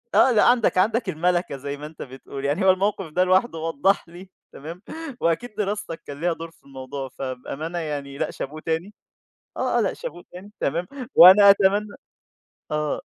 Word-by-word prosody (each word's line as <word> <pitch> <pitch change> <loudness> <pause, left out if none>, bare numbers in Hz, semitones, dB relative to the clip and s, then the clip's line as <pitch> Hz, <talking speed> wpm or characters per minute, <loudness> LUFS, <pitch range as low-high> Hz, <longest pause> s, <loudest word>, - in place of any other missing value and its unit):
آه 260 - +6
لأ 215 - +4
عندك 240 -6 +3
عندك 215 +2 +2
المَلَكَة 175 -2 0
زي 140 +1 -6
ما 150 - -8
أنت 155 0 -11
بتقول، 135 +1 -8
يعني 150 +8 0
هو 190 - +7
الموقف 195 0 -1
ده 180 +3 +2
لوحده 185 -1 +2
وضح 165 +4 0
لي 180 +2 -12 0.2
تمام 165 +6 -9 0.4
وأكيد 200 +7 -1
دراستك 205 -4 -3
كان 145 +2 -8
ليها 175 -1 +1
دور 165 0 -9
في 165 - -29
الموضوع 135 0 -7
فبأمانة 135 +6 -5
يعني 140 -3 -5
لأ - - -2
شابوه 155 +3 -7
تاني، 165 +6 -3 0.6
آه، - - 0
آه - - +3
لأ - - 0
شابوه - - -8
تاني 190 +4 -11
تمام، 170 +5 -1 0.3
وأنا 200 +3 +9
أتمنى 200 +1 +3 0.8
آه. 150 -1 -1
170 Hz, 175 wpm, -23 LUFS, 145-195 Hz, 0.8 s, وأنا